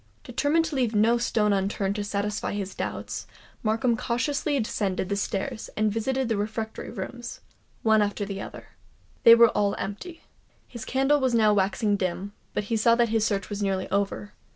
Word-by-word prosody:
Determined 320 Hz, +3 st, +1 dB
to 320 Hz, -2 st, -4 dB
leave 240 Hz, -4 st, 0 dB
no 230 Hz, +3 st, +4 dB
stone 210 Hz, -3 st, +2 dB
unturned 195 Hz, 0 st, 0 dB
to 205 Hz, -, -1 dB
satisfy 205 Hz, +1 st, -2 dB
his 200 Hz, -1 st, -4 dB
doubts, -, -, -5 dB, 0.3 s
Markham 230 Hz, +2 st, +1 dB
cautiously 270 Hz, +5 st, -1 dB
descended 195 Hz, -4 st, -1 dB
the 200 Hz, -, 0 dB
stairs, 200 Hz, +2 st, -3 dB
and 215 Hz, 0 st, +2 dB
visited 255 Hz, +4 st, -1 dB
the 225 Hz, -2 st, 0 dB
refectory 220 Hz, +2 st, -4 dB
rooms, 235 Hz, +3 st, -6 dB, 0.4 s
one 220 Hz, -1 st, +4 dB
after 205 Hz, 0 st, -1 dB
the 195 Hz, -1 st, -5 dB
other. -, -, -9 dB, 0.5 s
They 230 Hz, -, +9 dB
were 235 Hz, -1 st, +7 dB
all 205 Hz, -1 st, +1 dB
empty. 325 Hz, -, -6 dB, 0.4 s
His 235 Hz, -2 st, -8 dB
candle 270 Hz, +3 st, +2 dB
was 260 Hz, -3 st, +1 dB
now 215 Hz, -2 st, +5 dB
waxing 205 Hz, +1 st, +1 dB
dim; 190 Hz, +2 st, -3 dB, 0.2 s
but 210 Hz, -, 0 dB
he 225 Hz, +2 st, -1 dB
saw 230 Hz, +2 st, +4 dB
that 235 Hz, -1 st, +2 dB
his 225 Hz, -1 st, +1 dB
search 200 Hz, -3 st, 0 dB
was 205 Hz, 0 st, -3 dB
nearly 195 Hz, -2 st, 0 dB
over. 200 Hz, +1 st, -1 dB
215 Hz, 175 wpm, -26 LUFS, 200-235 Hz, 0.5 s, They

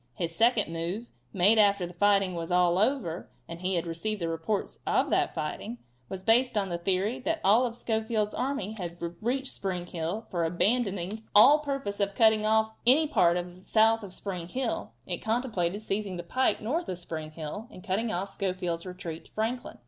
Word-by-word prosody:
His 165 Hz, -1 st, -3 dB
second 225 Hz, -6 st, +3 dB
move, 175 Hz, +8 st, -4 dB, 0.2 s
made 200 Hz, +4 st, +4 dB
after 200 Hz, -3 st, +4 dB
the 175 Hz, -, -9 dB
fighting 195 Hz, 0 st, +3 dB
was 165 Hz, 0 st, -4 dB
all 180 Hz, 0 st, +3 dB
over, 210 Hz, -, 0 dB, 0.2 s
and 170 Hz, +1 st, -8 dB
he 185 Hz, 0 st, 0 dB
had 170 Hz, -, 0 dB
received 170 Hz, +6 st, -3 dB
the 170 Hz, -, -2 dB
reports 165 Hz, +5 st, -2 dB
of -, -, +2 dB
that -, -, +1 dB
fighting, 120 Hz, -, -4 dB, 0.3 s
was 190 Hz, -1 st, -6 dB
based 235 Hz, +2 st, +3 dB
on 195 Hz, -2 st, 0 dB
the 170 Hz, -1 st, -3 dB
theory 195 Hz, +7 st, 0 dB
that 325 Hz, +5 st, -1 dB
all 225 Hz, +6 st, +5 dB
of 235 Hz, -, -7 dB
Schofield's 220 Hz, -2 st, -1 dB
army 260 Hz, -6 st, -2 dB
had 175 Hz, -1 st, -5 dB, 0.2 s
reached 260 Hz, +4 st, -1 dB
Spring 180 Hz, -3 st, -3 dB
Hill, 175 Hz, +5 st, -4 dB
for, 175 Hz, -2 st, 0 dB
abandoning 195 Hz, +2 st, 0 dB
all 265 Hz, +9 st, +8 dB
purpose 275 Hz, -9 st, -3 dB
of 200 Hz, -1 st, 0 dB
cutting 220 Hz, -1 st, +4 dB
off 220 Hz, 0 st, +3 dB, 0.2 s
any 290 Hz, +6 st, +6 dB
part 175 Hz, -, +3 dB
south 220 Hz, +5 st, +2 dB
of 200 Hz, -3 st, -8 dB
Spring 180 Hz, -3 st, -5 dB
Hill, 250 Hz, -, -3 dB
it 175 Hz, -, -3 dB
contemplated 220 Hz, -5 st, -1 dB
seizing 195 Hz, -3 st, -2 dB
the 175 Hz, -, -5 dB
pike 255 Hz, +10 st, +1 dB
north 315 Hz, +10 st, -1 dB
of 180 Hz, -, -3 dB
Spring 160 Hz, -3 st, -5 dB
Hill 155 Hz, +8 st, -7 dB
and 185 Hz, -, -12 dB
cutting 215 Hz, +3 st, -1 dB
off 190 Hz, +3 st, -2 dB
Schofield's 180 Hz, -3 st, -3 dB
retreat 175 Hz, -3 st, -7 dB
to -, -, -21 dB
Franklin. 230 Hz, +3 st, -3 dB
200 Hz, 185 wpm, -28 LUFS, 175-225 Hz, 0.3 s, all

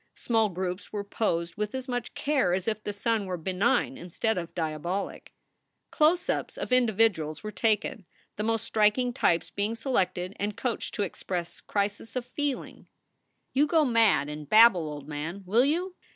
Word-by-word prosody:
Small 225 Hz, -3 st, +1 dB
groups 180 Hz, +1 st, -4 dB
were 205 Hz, -1 st, -3 dB
posed 170 Hz, -5 st, -1 dB
with 210 Hz, +3 st, -2 dB
as 260 Hz, 0 st, -4 dB
much 245 Hz, -2 st, -3 dB
care 280 Hz, -11 st, +1 dB
as 190 Hz, +2 st, -4 dB
if 215 Hz, -1 st, -1 dB
the 205 Hz, -, -2 dB
sun 215 Hz, 0 st, -1 dB
were 180 Hz, -1 st, -2 dB
benign 210 Hz, +10 st, +1 dB
instead 220 Hz, +6 st, -1 dB
of 170 Hz, -2 st, -5 dB
diabolic. 170 Hz, +4 st, -3 dB, 0.6 s
Close 320 Hz, +4 st, +3 dB
ups -, -, -2 dB
of -, -, -2 dB
individuals 220 Hz, -10 st, +2 dB
were 215 Hz, -, -4 dB
taken, 215 Hz, -2 st, 0 dB, 0.3 s
the -, -, -4 dB
most 225 Hz, 0 st, 0 dB
striking 220 Hz, +3 st, +2 dB
types 170 Hz, -8 st, +1 dB
being 205 Hz, +3 st, -1 dB
selected 190 Hz, -6 st, -1 dB
and 205 Hz, +1 st, -2 dB
coached 245 Hz, -2 st, -3 dB
to 205 Hz, -, 0 dB
express 175 Hz, -2 st, -4 dB
crises 205 Hz, +3 st, -2 dB
of 250 Hz, -1 st, -2 dB
feeling: 285 Hz, +1 st, -4 dB, 0.3 s
" -, -, -49 dB
You 285 Hz, +3 st, +4 dB
go 315 Hz, 0 st, +4 dB
mad 225 Hz, -, +4 dB
and 150 Hz, -1 st, -7 dB
babble, 215 Hz, -8 st, +6 dB
old 145 Hz, -1 st, -7 dB
man, 155 Hz, +6 st, -5 dB
will 225 Hz, +7 st, +4 dB
you? 350 Hz, +6 st, 0 dB
210 Hz, 170 wpm, -28 LUFS, 180-240 Hz, 0.6 s, babble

